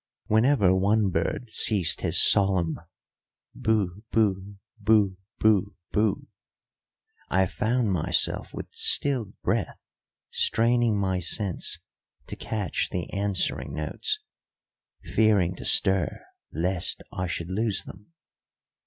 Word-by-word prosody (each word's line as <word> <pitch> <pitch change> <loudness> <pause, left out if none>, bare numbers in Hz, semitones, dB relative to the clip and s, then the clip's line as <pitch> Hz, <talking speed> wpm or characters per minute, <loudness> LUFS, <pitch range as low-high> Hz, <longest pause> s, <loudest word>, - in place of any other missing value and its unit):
Whenever 110 -4 +3
one 100 +1 +1
bird 90 +8 -3
ceased 95 -9 +2
his - - +2
solemn 95 -5 +2 0.7
boo 105 -3 -1
boo 100 -2 0 0.2
boo 105 -2 +2 0.2
boo 105 -2 +2 0.2
boo, 105 -1 0 1.0
I 95 0 +2
found 110 +2 -1
myself 90 -5 -1
with - - -7
stilled 125 -8 +1
breath - - -2 0.5
straining 115 -1 +2
my 95 -2 -1
sense 90 +2 -2 0.5
to - - -8
catch 105 -3 -3
the 90 -2 -5
answering 100 -2 -1
notes, 75 0 -2 0.8
fearing 105 -5 +2
to - - -8
stir 95 -2 +4 0.3
lest 90 +3 -1
I 90 0 -3
should 85 0 -5
lose 105 +1 0
them. 105 - -14
100 Hz, 105 wpm, -25 LUFS, 95-110 Hz, 1.0 s, stir